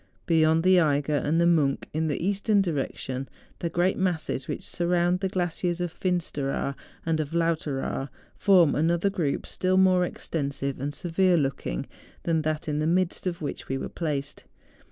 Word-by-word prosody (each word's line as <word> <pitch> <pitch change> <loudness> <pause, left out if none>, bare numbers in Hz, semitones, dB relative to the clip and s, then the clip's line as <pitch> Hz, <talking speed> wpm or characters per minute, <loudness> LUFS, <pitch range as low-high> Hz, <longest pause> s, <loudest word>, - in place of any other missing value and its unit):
Beyond 160 -1 +3
the 185 0 +6
Eiger 145 -2 +2
and 150 +4 +1
the 170 - +4
Monch, 155 -5 +3
in 160 +1 0
the 145 - -1
eastern 205 +1 +2
direction 135 -6 -2 0.3
the 170 - -2
great 175 +3 +1
masses 165 -7 -1
which - - -4
surround 175 +1 +1
the 190 0 -1
glaciers 175 -1 -1
of 175 -2 -2
Finsteraar 150 -7 -1 0.3
and 160 -1 +1
of 155 +1 -3
Lauteraar, 155 -5 -1 0.3
form 180 -7 +5
another 170 +5 +2
group 160 -7 -1
still 185 0 0
more 185 -1 +5
extensive 140 -5 -3
and 140 +2 -2
severe 175 +4 +2
looking 135 - -2 0.4
than 165 -2 +1
that 155 0 -2
in 150 -1 -1
the 155 - 0
midst 180 +2 0
of 170 -3 -3
which 145 - -5
we 135 - -1
were - - -4
placed. 145 -4 -4
165 Hz, 165 wpm, -26 LUFS, 145-180 Hz, 0.4 s, the